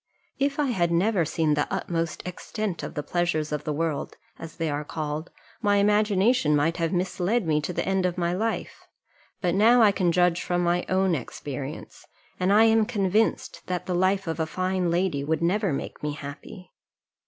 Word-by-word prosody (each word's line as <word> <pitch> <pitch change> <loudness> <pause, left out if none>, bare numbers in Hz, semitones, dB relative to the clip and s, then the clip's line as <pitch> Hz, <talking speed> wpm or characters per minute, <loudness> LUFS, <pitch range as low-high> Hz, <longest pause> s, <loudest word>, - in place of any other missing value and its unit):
If 280 +1 0
I 290 -4 +1
had 175 -6 +1
never 180 +1 +2
seen 155 0 +1
the 150 0 -1
utmost 165 -1 -2
extent 180 0 -4
of - - -7
the 150 - -3
pleasures 160 -2 -1
of 150 -1 -3
the 155 - -1
world, 155 -1 -2 0.2
as 165 - -9
they 165 -2 -2
are 145 0 -2
called, 155 +1 -4 0.3
my 205 -2 +3
imagination 205 -3 +3
might 165 +4 +1
have 165 -2 0
misled 185 +4 0
me 155 -2 +1
to 165 - -3
the - - -2
end 190 -1 +2
of 180 0 -4
my 175 -1 0
life; 220 +5 -3 0.5
but 175 -2 +1
now 230 +5 +5
I 210 - +6
can 185 -3 +1
judge 175 0 +2
from 175 0 0
my 175 +1 0
own 190 -1 +2
experience, 140 +1 -6 0.3
and 185 +1 +2
I 210 +2 +6
am 225 -1 +4
convinced 210 -1 0
that 180 -1 -3
the 185 - -2
life 190 +2 +1
of 165 0 -3
a 160 - 0
fine 185 +1 -1
lady 170 -5 0
would 160 +2 -1
never 195 +2 +1
make 135 - -5
me 150 -1 -2
happy. 145 +5 -9
175 Hz, 190 wpm, -26 LUFS, 160-195 Hz, 0.5 s, I